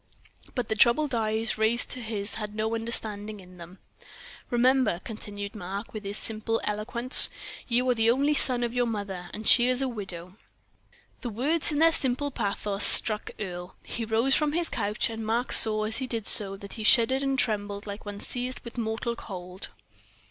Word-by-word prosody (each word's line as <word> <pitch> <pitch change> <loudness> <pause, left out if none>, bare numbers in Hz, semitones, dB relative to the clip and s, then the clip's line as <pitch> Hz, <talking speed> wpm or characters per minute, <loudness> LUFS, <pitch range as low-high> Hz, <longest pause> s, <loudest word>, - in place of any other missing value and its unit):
But 245 -4 -3
the - - -1
troubled 255 +6 +2
eyes 220 0 -2
raised 220 +2 -1
to 255 - -6
his 215 -3 -5
had 210 -1 -7
no 220 +1 -2
understanding 215 -2 -2
in 180 -1 -16
them. 175 +2 -13 0.7
"Remember," 250 -5 +1
continued 205 -2 -7
Mark, 200 +1 -8
with 215 -2 -8
his 200 +1 -4
simple 225 +1 -2
eloquence, 235 +5 +3 0.4
"you 250 +1 0
are 250 - +3
the 225 -1 +1
only 280 +5 +1
son 255 -4 +5
of 235 -1 -3
your 245 -1 0
mother, 200 -5 -6
and 215 0 -7
she 245 -1 +6
is 255 0 -1
a 270 - -1
widow." 190 -5 -8 0.8
The 245 - -5
words, 285 +10 0
in 295 - -3
their 325 +2 +4
simple 285 -1 -2
pathos, 200 -3 -2
struck 215 -2 +8
Earle. 180 -2 -7
He 235 - -6
rose 225 +4 0
from 300 +1 +1
his 340 +1 -1
couch, 210 -2 -2
and 225 0 -7
Mark 230 +3 -2
saw, 215 -1 +7
as 220 +1 -2
he 260 - -4
did 225 -4 -4
so, 195 -1 0
that 200 0 -11
he 220 - -7
shuddered 240 +4 +4
and 270 -1 -2
trembled 205 -4 -2
like 205 0 -8
one 205 -1 -8
seized 250 +3 -5
with 235 +1 -9
mortal 230 +1 -3
cold. 185 -3 -9
225 Hz, 185 wpm, -26 LUFS, 205-245 Hz, 0.8 s, struck